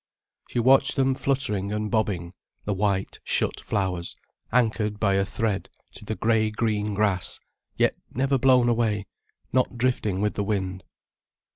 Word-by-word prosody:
She - - -5
watched 135 +3 +5
them 135 0 +3
fluttering 130 -8 -1
and 105 0 -2
bobbing, 95 -6 -1 0.3
the 105 - 0
white, 100 -1 -1
shut - - 0
flowers, 90 -4 -2 0.4
anchored 110 -3 +1
by 100 -2 +2
a 95 0 +3
thread 105 0 -2 0.2
to - - -12
the 110 - -3
grey 110 -1 +2
green 105 -2 -1
grass, 100 -3 0 0.4
yet - - +3 0.2
never 135 +1 +1
blown 125 -1 +5
away, 115 -4 +1 0.5
not 130 -1 +1
drifting 115 -6 0
with 105 +1 0
the 100 - -1
wind. 95 -3 -2
105 Hz, 145 wpm, -25 LUFS, 100-120 Hz, 0.5 s, watched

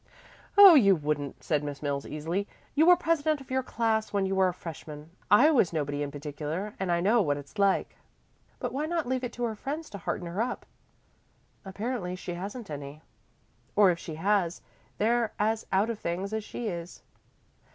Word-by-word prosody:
"Oh, 400 -3 +11
you 200 -10 +6
wouldn't," 145 -2 -3
said 150 -2 0
Miss 145 0 -6
Mills 140 -1 -2
easily. 165 +7 -3 0.3
"You 315 +3 +4
were 355 - +9
president 315 -3 +1
of 270 -1 -13
your 260 0 +1
class 225 -3 -1
when 200 -1 +1
you 190 - -1
were 190 -1 +3
a 180 - -1
freshman. 155 -2 -9 0.2
I 255 +10 +7
was 240 - +3
nobody 145 -3 -2
in 145 - -2
particular, 150 +7 -5
and 190 -2 -1
I 170 0 +2
know 220 +5 +4
what 145 -6 0
it's 145 +8 -10
like." 200 -1 +2 0.6
"But - - -4
why 295 +3 -1
not 335 -1 -1
leave 260 0 -1
it 245 - -3
to 245 - -5
her 230 -2 0
friends 295 +9 -5
to 200 - -7
hearten 175 - -3
her 175 +5 -3
up?" 245 +2 -3 1.0
"Apparently 200 -1 -4
she 180 -1 -6
hasn't 200 +3 -6
any, 145 +1 -7 0.7
or 200 -3 +6
if 170 - -3
she 160 - -7
has, 185 0 0 0.3
they're 230 +1 +1
as 220 +1 0
out 200 +4 +2
of 220 - -6
things 185 +5 -3
as 220 -1 -2
she 235 +2 -5
is." 175 -3 -6
195 Hz, 195 wpm, -28 LUFS, 160-235 Hz, 1.0 s, Oh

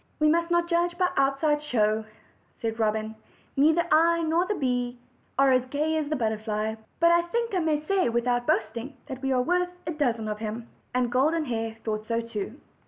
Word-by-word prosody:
"We 305 0 +4
must 335 +2 +2
not 345 0 +2
judge 345 0 +1
by 360 -1 +2
outside 275 +2 +2
show," 220 -6 +1 0.5
said 225 0 -3
Robin. 220 0 0 0.4
"Neither 315 +5 +4
I 335 +1 +4
nor 330 +3 +1
the 420 - 0
bee 250 -5 -1 0.4
are 275 0 +5
as 255 0 +2
gay 300 +4 0
as 310 -2 -1
the 305 - 0
butterfly, 220 -2 -1 0.3
but 335 +1 +5
I 340 0 +5
think 465 +4 -1
I 370 - +2
may 310 -2 0
say, 385 -5 +2
without 245 +1 0
boasting, 230 +5 -1
that 260 -1 -7
we 270 -1 -1
are 250 -1 +2
worth 360 +4 +1 0.2
a 330 - -2
dozen 240 -8 0
of 210 0 -3
him." 225 +2 -5 0.3
And 250 -1 +1
Golden 305 +6 +2
Hair 225 -3 -3
thought 215 -1 -3
so 230 0 0
too. 230 +2 -5
270 Hz, 195 wpm, -27 LUFS, 230-325 Hz, 0.5 s, are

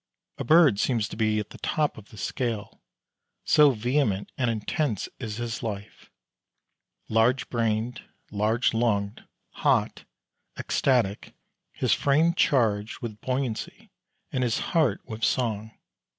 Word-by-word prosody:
A - - -2
bird 150 -7 +5
seems 115 -4 +1
to - - -7
be 110 -1 +1
at 105 - -6
the - - -11
top 150 -2 0
of 105 -2 -13
the 110 - -14
scale, 110 +1 -3 0.6
so 150 -2 +6
vehement 120 -4 0
and 125 -3 0
intense 115 - -1
is 110 -3 -5
his 120 -1 -4
life 105 -3 -7 1.0
large 115 +4 +2
brained, 115 +1 -1 0.3
large 110 +4 +1
lunged, 105 -3 0 0.4
hot, - - +1 0.5
ecstatic, 115 -7 0 0.4
his - - +1
frame 155 +4 +3
charged 110 -10 +1
with 110 -3 -6
buoyancy 140 - -3 0.4
and 130 -4 0
his 120 -2 +1 0.2
heart 150 - +2
with 110 -1 -7
song. 110 -4 0
115 Hz, 125 wpm, -26 LUFS, 105-130 Hz, 1.0 s, so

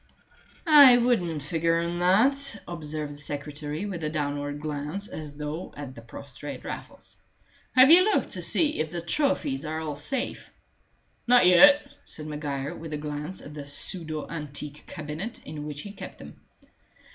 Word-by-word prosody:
"I 285 -6 +9
wouldn't 180 - +1
figure 165 +2 +1
on 170 +1 -2
that," 235 +8 +3
observed 155 -3 -5
the - - -10
secretary, 150 +3 -4
with 180 -5 -5
a 155 - -1
downward 145 -1 -3
glance 150 +6 -4
as 150 -2 -8
though 150 +4 -6
at 140 -3 -7
the 115 - -11
prostrate 135 +3 -9
Raffles. - - -8 0.6
"Have 260 +3 +8
you 350 +2 +9
looked 425 +2 +1
to - - -2
see 305 -2 +2
if 155 - -1
the 170 +1 -4
trophies 280 - 0
are 155 +1 -3
all 155 -2 -4
safe?" 245 - -1 0.8
"Not 245 -5 +6
yet," 285 +12 +7 0.2
said 155 - -7
Maguire, 150 -1 -4
with 160 -2 -8
a - - -2
glance 150 +4 -5
at 150 - -10
the 145 -2 -8
pseudo 155 +1 -2
antique 150 -2 -5
cabinet 160 +8 -6
in 150 0 -7
which 150 -1 -5
he 205 - -8
kept - - -10
them. - - -13
155 Hz, 160 wpm, -26 LUFS, 150-200 Hz, 0.8 s, I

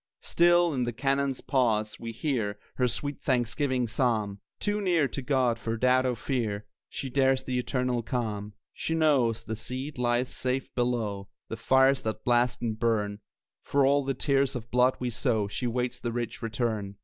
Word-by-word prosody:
Still, 175 -1 +4
in 130 -2 0
the 120 0 -2
cannon's 135 +2 0
pause, 115 -5 +1
we 115 -1 -5
hear 115 -5 -2 0.2
Her 125 - +1
sweet 145 +4 -4
thanksgiving 125 0 0
psalm; 110 -4 0 0.2
Too 205 0 -1
near 170 -7 +2
to 140 - -4
God 125 -3 +1
for 115 0 -3
doubt 130 +2 +3
or 125 - 0
fear, 110 -4 -2 0.2
She 135 - -5
shares 135 -1 +3
the 125 -1 -1
eternal 125 -1 -1
calm. 110 -4 -3 0.2
She 160 - -2
knows 130 -8 +2
the 110 - -4
seed 130 +5 -5
lies 120 +1 +1
safe 130 +1 -2
below 115 -5 -1 0.2
The - - -4
fires 135 0 +4
that 110 0 -4
blast 120 0 +2
and 110 -2 -2
burn; 105 -3 0 0.4
For 140 -1 +2
all 140 +1 +3
the 135 0 -2
tears 140 -1 +1
of 115 -2 -6
blood 125 +1 +4
we 125 -1 -2
sow 110 -3 0
She 120 +5 -3
waits 125 +1 -2
the 120 - -3
rich 120 0 -4
return. 110 -3 -2
125 Hz, 175 wpm, -28 LUFS, 115-135 Hz, 0.4 s, Still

